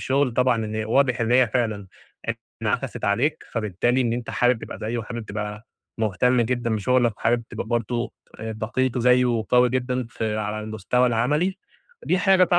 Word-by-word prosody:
الشغل 135 -1 +1
طبعًا 125 -2 +2
إن 110 0 -5
هي 110 0 -1
واضح 125 +2 +2
إن 115 +1 +1
هي 125 0 +6
فعلًا 110 -4 -1 0.8
انعَكسِت - - -2
عليك، 130 +10 0
فبالتالي 115 +3 0
إن 120 -2 +1
أنت 120 -1 -3
حابب 125 -2 +2
تبقى - - -8
زيُه، 115 +3 -3
و - - -3
حابب 120 0 -6
تبقى 105 +1 -5 0.3
مهتم 115 +4 +2
جدًا 120 -1 0
بشغلك، 120 +1 +2
وحابب 120 +1 +1
تبقى - - -5
برضه 120 +1 -1 0.3
ت - - -10
دقيق 115 +3 -1
زيُّه 125 +1 +4
وقوي 125 +1 +3
جدًا 125 -1 -1
في 110 -1 -2
على 105 0 -2
المستوى 110 +4 0
العملي، 150 - +1 0.5
دي 185 - +2
حاجة 185 -1 +4
120 Hz, 170 wpm, -24 LUFS, 110-125 Hz, 0.8 s, هي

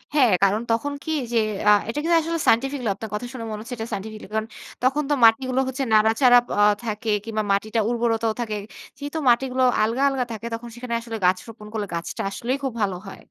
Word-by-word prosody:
হ্যাঁ, 255 -7 +5
কারণ 205 +3 +3
তখন 285 +6 0
কি 315 - -4 0.2
যে - - +3 0.3
আ - - +8 0.2
এটা 260 +6 -2
কিন্তু 335 0 +4
আসলে 330 +1 -2
সায়েন্টিফিক্যালই 250 -1 +2
আপনার 220 +1 -7
কথা 210 +4 -3
শুনে 235 -3 -6
মনে 210 - -4
হচ্ছে 235 +2 -6
এটা 225 +1 -4
সায়েন্টিফিক্যালই 215 +1 -6
কারণ 220 0 -1 0.4
তখন 280 +4 +2
তো - - +3
মাটিগুলো 255 +3 +3
হচ্ছে 265 +1 -2
নাড়াচাড়া 225 +3 +5 0.2
আ - - +6 0.2
থাকে 220 +1 -3 0.2
কিংবা 220 -1 -2
মাটিটা 215 +3 0
উর্বরতাও 230 -2 0
থাকে 215 -3 -3 0.4
যেহেতু 290 +3 -4
মাটিগুলো 255 +1 +2 0.2
আলগা, 230 +5 0
আলগা 265 -2 -1
থাকে 220 +1 -7
তখন 235 +1 -6
সেখানে 240 -1 -5
আসলে 230 -1 -6
গাছ 185 +1 +4
রোপণ 220 -2 -11
করলে 210 -2 -2
গাছটা 170 0 -4
আসলেই 245 +6 -2
খুব 270 - -1
ভালো 195 -2 0
হয়। 195 - -9
230 Hz, 205 wpm, -23 LUFS, 215-260 Hz, 0.4 s, আ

